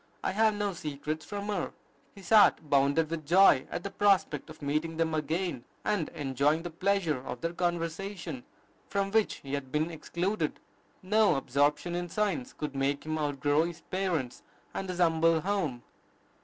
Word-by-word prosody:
I - - 0
have 215 +2 +3
no 205 -1 -1
secrets 155 -1 -4
from 205 0 -5
her." 200 -4 -2 0.4
His 195 -3 -11
heart 210 -7 +6
bounded 140 +3 +3
with 165 -2 -3
joy 170 -3 +5
at 175 - -4
the 200 - -4
prospect 200 -4 +2
of 155 - -11
meeting 155 +3 -2
them 165 -1 +1
again, 155 -2 -1 0.2
and 205 -7 0
"enjoying 145 +3 +1
the 175 - -5
pleasure 175 -4 +1
of 125 -1 -7
their 165 0 -2
conversation, 170 -3 -3 0.5
from 195 -1 -1
which 220 0 +2
he 135 0 -9
had 135 -2 -3
been 155 +3 0
excluded." 170 +1 -2 0.4
No 210 -2 +4
absorption 145 +5 +1
in 175 0 -3
science 210 +7 -1
could 150 -2 -5
make 140 +2 0
him 155 0 -2
outgrow 145 0 +1
his 170 0 -6
parents 175 -10 -1 0.3
and 190 - -4
his 180 - -3
humble 165 -1 +3
home. 175 -11 -1
165 Hz, 165 wpm, -30 LUFS, 145-195 Hz, 0.5 s, heart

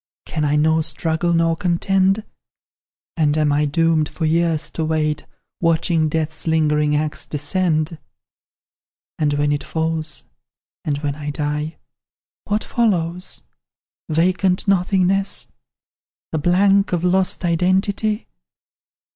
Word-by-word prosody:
Can 155 - -3
I 150 0 +2
nor 160 +1 +3
struggle, 165 +1 0
nor 165 -1 +2
contend? 190 +4 +1 0.9
And 150 -2 +2
am 150 -1 +2
I 145 +1 +2
doomed 160 +1 +2
for 165 - -3
years 165 0 +1
to 160 - -3
wait, 155 -1 -1 0.3
Watching 165 -1 +2
death's 160 +1 -3
lingering 150 -2 +2
axe 150 0 -2
descend? 155 +1 -1 1.2
"And 150 -2 +1
when 145 0 +1
it 145 - -1
falls, 160 -1 -2 0.6
and 145 -2 -1
when 145 -1 0
I 145 0 -6
die, 150 +1 -3 0.7
What 210 +1 0
follows? 180 -6 -1 0.7
Vacant 180 +4 +1
nothingness? 195 0 +1 0.8
The 160 - -1
blank 195 +4 +3
of 175 -1 0
lost 185 0 +1
identity? 190 +5 +1
165 Hz, 115 wpm, -20 LUFS, 150-180 Hz, 1.2 s, nor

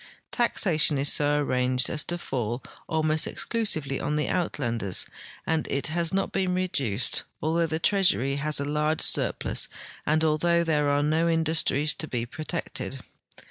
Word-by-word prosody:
Taxation 160 - +3
is 140 +1 +2
so 145 0 +3
arranged 130 -2 +1
as 150 - 0
to 175 - -3
fall 125 -6 -3 0.3
almost 155 -1 +1
ex - - -1
clusively 160 - -1
on 150 - -1
the 150 - 0
Uitlanders, 120 - 0 0.4
and 160 -1 0
it 140 - 0
has 170 -1 0
not 195 +1 -1
been 185 -1 0
reduced, 135 - 0 0.2
altbough 165 +1 0
the 160 - -1
treasury 165 -7 +2
has 150 +1 0
a 140 - -2
large 150 +2 0
sur|)lus - - +1 0.4
and 155 +1 +1
although 170 +2 +2
there 150 -3 +1
are 145 0 +2
no 160 +3 +2
in 165 -1 +2
dustries 155 -2 +2
to 155 - -4
be 120 -4 -3
protected. 145 +5 -4
155 Hz, 160 wpm, -26 LUFS, 140-165 Hz, 0.4 s, Taxation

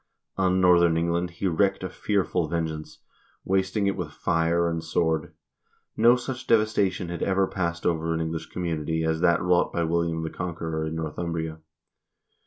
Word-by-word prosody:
On 95 -1 +2
northern 85 -2 +5
England 85 +1 0
he 85 +3 -3
wreaked 95 +3 +1
a 95 - -3
fearful 95 -5 0
vengeance, 80 -1 -4 0.4
wasting 95 +2 +1
it 100 - +1
with 90 -5 -5
fire 85 +1 +1
and 85 -1 -2
sword. 80 -1 0 0.6
No 120 +2 +6
such 125 +1 -5
devastation 100 -5 +2
had 85 - -5
ever 95 0 +2
passed 85 -3 -3
over 80 -1 0
an 80 - 0
English 80 0 -3
community 80 -2 -2
as 80 0 0
that 85 0 +3
wrought 90 -1 +2
by 85 - -1
William 85 0 0
the 80 - -4
Conqueror 80 -3 -3
in 80 - -4
Northumbria. 80 0 -3
85 Hz, 160 wpm, -26 LUFS, 80-95 Hz, 0.6 s, No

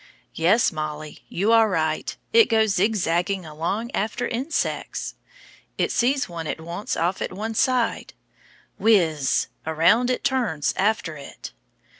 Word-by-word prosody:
Yes, 185 +8 +3
Mollie, 155 -1 -6
you 200 +6 +1
are 225 -1 +5
right, 160 -4 -1 0.2
it 460 -1 +6
goes 220 -1 +3
zigzagging 190 -2 0
along 170 +10 -3
after 225 +4 -2
insects. 260 +7 -2 0.6
It - - 0
sees 265 +3 +1
one 165 -2 -6
it - - -3
wants 170 +5 -4
off 175 +3 0
at - - -2
one 215 +4 -4
side 245 0 0 0.6
whizz! 160 -11 +3 0.2
around 170 +10 +3
it 255 - -1
turns 240 - 0
after 200 -5 0
it. 140 - -10
195 Hz, 130 wpm, -23 LUFS, 160-225 Hz, 0.6 s, it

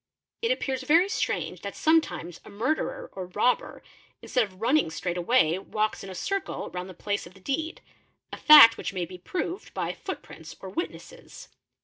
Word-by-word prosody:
It 460 - 0
appears 265 - -1
very 325 +8 +4
strange 425 - -2
that - - -6
sometimes 310 - +1
a - - -13
murderer 315 - -2
or 185 -1 -6
robber 210 +7 0 0.4
ns - - -11
ead 250 - +5
of 185 -2 -17
running 265 - +2
straight 175 +2 -3
away 180 -2 +2
walks 215 +2 -2
in 195 - -8
a 190 - -8
circle 395 - -3
round 180 +1 -6
the 185 - -11
place 205 0 -3
of 180 - -17
the - - -16
deed, 310 - -3 0.5
a - - -5
fact 295 -7 +9
which - - -4
may 180 -2 -2
be 180 +1 -11
proved 360 - -5
by - - -2
footprints - - -8
or - - -8
witnesses. 485 +8 -7
230 Hz, 185 wpm, -27 LUFS, -, 0.5 s, fact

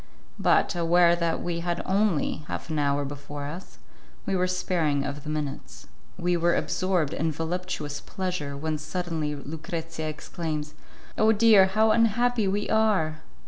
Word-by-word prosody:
But, - - +3
aware 170 0 +4
that 170 -1 -1
we 170 -1 -2
had 175 0 -2
only 195 -5 +1
half - - -5
an 155 - 0
hour 140 0 +1
before 145 0 -6
us, 165 +6 -8 0.5
we 195 - 0
were 185 0 +2
sparing 165 -6 0
of 145 0 -5
the 150 - -6
minutes. 150 -2 -5 0.3
We 175 0 +1
were 170 0 +2
absorbed 185 -6 0
in 160 +1 0
voluptuous 160 -2 -4
pleasure 180 -8 -4
when 155 +1 -2
suddenly 155 -1 -3
Lucrezia 160 +2 -5
exclaims, 155 -1 -4 0.5
"Oh! 220 +1 +5
dear, 215 -3 +6
how 215 +3 +3
unhappy 230 0 +2
we 200 +2 0
are!" 205 -8 +2
170 Hz, 145 wpm, -26 LUFS, 150-185 Hz, 0.5 s, dear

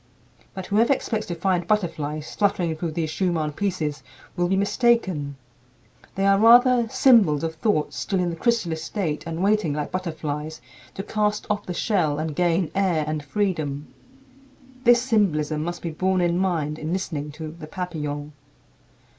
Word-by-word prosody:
But 190 -1 -5
whoever 220 +6 +2
expects 220 -5 -3
to 175 - -3
find 175 0 0
butterflies 155 -7 -1
fluttering 185 -5 +1
through 160 0 -4
these 160 -1 -2
Schumann 165 -5 0
pieces 155 -4 -2 0.3
will 175 -1 +1
be 190 - +1
mistaken. 195 - +1 0.8
They 195 - 0
are 195 0 +4
rather 240 +1 +6
symbols 205 - +4
of 165 0 -2
thoughts 160 -2 0
still 195 -3 -1
in 175 -1 0
the - - -5
chrysalis 170 -6 0
state 165 -6 -3
and 165 +2 -3
waiting, 200 -6 +2
like 150 0 -3
butterflies, 155 -3 -4 0.4
to 195 - -4
cast 210 0 -1
off 210 - -2
the 180 - -4
shell 170 -10 +1
and 155 -1 -3
gain 175 -1 +1
air 185 -5 +1
and 155 -1 -3
freedom. 155 -6 -2 0.9
This 240 0 +6
symbolism 160 - +1
must 175 +1 -5
be 170 - -3
borne 185 +3 0
in 175 0 +1
mind 160 -5 -1
in 155 +1 -4
listening 160 -5 -3
to 155 0 -7
"The 160 -1 -10
Papillons." 150 -4 -5
175 Hz, 160 wpm, -24 LUFS, 155-200 Hz, 0.9 s, rather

